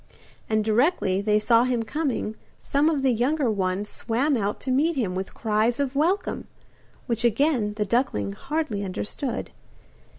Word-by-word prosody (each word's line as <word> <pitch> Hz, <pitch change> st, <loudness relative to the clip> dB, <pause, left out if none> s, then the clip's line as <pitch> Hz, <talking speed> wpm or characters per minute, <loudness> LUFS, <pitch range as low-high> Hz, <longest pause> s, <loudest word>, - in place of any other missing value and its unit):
And 215 Hz, -1 st, +1 dB
directly 220 Hz, -, +2 dB
they 210 Hz, 0 st, +2 dB
saw 230 Hz, +2 st, +4 dB
him 245 Hz, -2 st, 0 dB
coming 255 Hz, -3 st, -2 dB, 0.2 s
some 290 Hz, +3 st, +2 dB
of 290 Hz, -4 st, 0 dB
the 265 Hz, -, +4 dB
younger 255 Hz, +2 st, +1 dB
ones 195 Hz, 0 st, -1 dB
swam 250 Hz, +8 st, 0 dB
out 205 Hz, -3 st, -1 dB
to 260 Hz, -, -2 dB
meet 310 Hz, +6 st, +2 dB
him 220 Hz, -9 st, -1 dB
with 190 Hz, +1 st, -5 dB
cries 220 Hz, +3 st, +1 dB
of 280 Hz, -1 st, -1 dB
welcome, 345 Hz, +8 st, 0 dB, 0.6 s
which 235 Hz, -1 st, -2 dB
again 235 Hz, -3 st, +2 dB
the 210 Hz, -1 st, -1 dB
duckling 195 Hz, -, 0 dB
hardly 270 Hz, -, -3 dB
understood. 205 Hz, +7 st, -4 dB
235 Hz, 155 wpm, -25 LUFS, 210-275 Hz, 0.6 s, saw